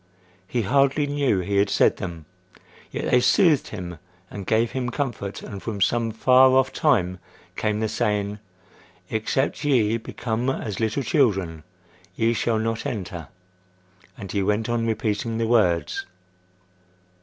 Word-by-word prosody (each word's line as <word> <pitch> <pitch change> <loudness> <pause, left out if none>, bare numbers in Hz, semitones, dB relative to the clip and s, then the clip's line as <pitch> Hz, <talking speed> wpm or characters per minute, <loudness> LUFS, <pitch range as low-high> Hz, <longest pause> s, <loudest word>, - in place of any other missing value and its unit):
He 120 +1 -1
hardly 140 +5 +2
knew 140 -9 +1
he 100 +3 -1
had 100 0 +3
said - - +3
them; 85 -4 -6 0.6
yet - - -3
they 125 - +6
soothed 165 - +4
him 90 -5 -7 0.3
and 100 -2 -7
gave 110 +1 +2
him 125 -2 -2
comfort; 120 -7 -4
and 100 -2 -7
from 110 -3 -5
some 115 +4 +1
far 130 +4 +5
off 130 0 +2
time 90 - +1 0.4
came 105 0 -1
the 110 - +1
saying, 105 -2 -1 0.7
"Except 130 +7 -1
ye 115 -6 +2
become 115 +1 -3
as 105 -7 -3
little 110 +4 0
children, 95 - +1 0.5
ye 115 +1 +2
shall 115 -1 0
not 115 0 -2
enter—" 90 - -5 0.9
and 100 -6 -7
he 100 - 0
went 105 +3 0
on 115 -1 0
repeating 110 +1 -1
the 115 - 0
words. 105 -8 +1
110 Hz, 145 wpm, -24 LUFS, 100-125 Hz, 0.9 s, they